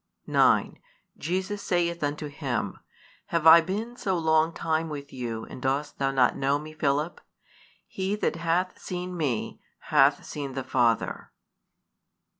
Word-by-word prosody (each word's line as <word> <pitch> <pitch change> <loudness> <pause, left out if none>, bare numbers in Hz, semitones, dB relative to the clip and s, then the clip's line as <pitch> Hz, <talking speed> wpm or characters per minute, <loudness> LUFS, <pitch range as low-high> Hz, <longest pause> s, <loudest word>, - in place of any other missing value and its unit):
|254 - - -8
9 - - +4 0.4
Jesus 190 +5 -2
saith 170 -3 0
unto 145 +1 -2
him, 135 -8 -3 0.5
Have 165 -2 -1
I 165 +1 +10
been 215 +8 -4
so 190 -6 -1
long 160 0 +3
time 160 0 -1
with 145 -2 -7
you, 115 -3 -4
and - - -10
dost 135 +3 -1
thou 135 -1 +2
not 130 -3 +3
know 140 +1 +1
Me, 155 +1 -9
Philip? 150 +2 -1 0.7
He 190 +1 -2
that 210 - -1
hath 170 +2 0
seen 180 0 -5
Me 145 -9 -2 0.2
hath 145 -1 +3
seen 140 -3 -5
the 135 0 -3
Father. 120 -4 0
155 Hz, 145 wpm, -27 LUFS, 135-175 Hz, 0.7 s, I